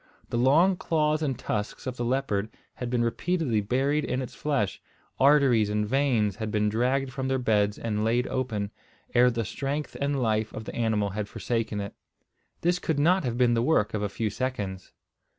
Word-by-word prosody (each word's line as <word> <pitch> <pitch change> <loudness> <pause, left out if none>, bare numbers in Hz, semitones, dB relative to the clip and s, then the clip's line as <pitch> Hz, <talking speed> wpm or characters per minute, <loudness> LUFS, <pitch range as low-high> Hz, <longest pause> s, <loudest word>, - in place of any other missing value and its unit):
The - - -1
long 165 +9 +4
claws 155 -2 +1
and 135 -5 -1
tusks 105 -1 -3
of 130 - -3
the 120 - -3
leopard 120 -5 0 0.2
had 125 - -5
been 120 -1 +1
repeatedly 130 -1 0
buried 135 +8 +1
in 125 - -1
its 130 -3 -5
flesh, 140 -10 -1 0.4
arteries 135 -6 +5
and 105 0 0
veins 120 -5 +1
had 110 -1 -3
been 105 -1 +1
dragged 130 +4 0
from 130 0 -3
their 135 0 +1
beds 105 -4 +1
and 105 -2 -2
laid 120 +3 +2
open, 110 -6 -2 0.4
ere 125 +1 +6
the 115 -2 -2
strength 140 +7 -3
and 140 0 0
life 110 -2 0
of 110 - -6
the - - -7
animal 110 -4 0
had 100 +1 -4
forsaken 115 -3 -2
it. 100 0 -5 0.7
This 175 +1 +2
could 160 -4 -1
not 170 +5 +3
have 120 -2 -2
been 120 -1 +4
the 115 - +2
work 115 -6 +2
of 105 - -1
a 105 - -1
few 105 +1 -2
seconds. 105 -7 -4
120 Hz, 190 wpm, -27 LUFS, 105-135 Hz, 0.7 s, ere